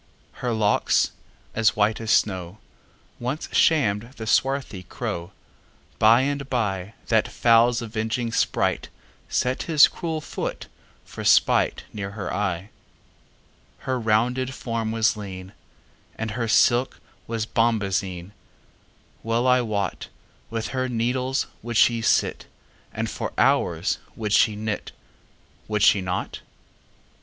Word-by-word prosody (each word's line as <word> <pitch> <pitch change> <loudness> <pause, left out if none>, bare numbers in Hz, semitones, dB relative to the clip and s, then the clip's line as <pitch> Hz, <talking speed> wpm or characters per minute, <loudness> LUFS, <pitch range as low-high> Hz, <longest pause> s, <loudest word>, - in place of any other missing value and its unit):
Her 125 - -1
locks, 110 -2 +2 0.4
as 115 -1 +2
white 110 +1 +1
as 110 - -5
snow, 95 -3 +1 0.6
Once 130 +6 -3
sham'd 115 -6 +2
the 110 - -6
swarthy 130 -3 0
crow:By 100 +6 -1
and 140 0 -2
byThat 110 0 -1
fowl's 120 +1 +3
avenging 115 +1 -2
spriteSet 115 - -2
his 155 -3 +7
cruel 165 -3 -4
foot - - -5 0.4
for - - -8
spiteNear 100 -2 +2
her 100 -2 -5
eye. 95 0 -2 1.1
Her 130 -1 -1
rounded 125 +4 +1
form 115 -2 -3
was 115 0 +2
lean, 95 -2 -8 0.6
And 110 -1 -4
her 115 +1 -2
silk 120 +3 +3 0.3
was 115 -1 -2
bombazine:Well 105 +2 -3
I 125 0 +5
wotWith 110 +1 -5
her 130 -1 -2
needles 125 +3 0 0.2
would 120 -1 -3
she 115 0 +4
sit, - - +1 0.4
And - - -3
for - - -5
hours - - +2 0.2
would 105 -2 -3
she 110 -2 +4
knit,—Would 105 0 -6
she 100 - +5
not? 90 0 -3
115 Hz, 105 wpm, -24 LUFS, 105-125 Hz, 1.1 s, his